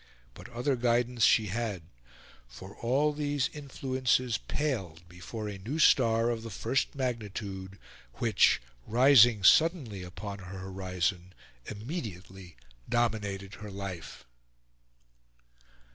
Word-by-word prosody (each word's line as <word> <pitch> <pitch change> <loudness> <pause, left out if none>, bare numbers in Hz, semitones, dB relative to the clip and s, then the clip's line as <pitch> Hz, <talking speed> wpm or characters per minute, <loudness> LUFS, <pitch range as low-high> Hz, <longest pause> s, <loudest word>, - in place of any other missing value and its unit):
But - - -12
other 125 +3 -1
guidance 120 0 +1
she 110 -2 +4
had; 110 -7 -3 0.6
for - - -12
all 140 +6 +1
these 145 -2 -1
influences 130 -4 -1
paled 95 - -3
before 90 +5 -7
a 100 -2 -6
new 120 +11 -4
star, 115 -6 +4
of 115 -1 -3
the 115 - -7
first 130 +6 -1
magnitude, 100 -6 -4 0.4
which, 110 -4 +3 0.3
rising 120 -3 +6
suddenly 145 - +4
upon 95 +3 -7
her 95 0 -9
horizon, 95 -1 -3 0.3
immediately 100 - -7 0.3
dominated 105 -4 -1
her 105 - -7
life. 95 -4 -7
110 Hz, 105 wpm, -29 LUFS, 95-125 Hz, 0.6 s, rising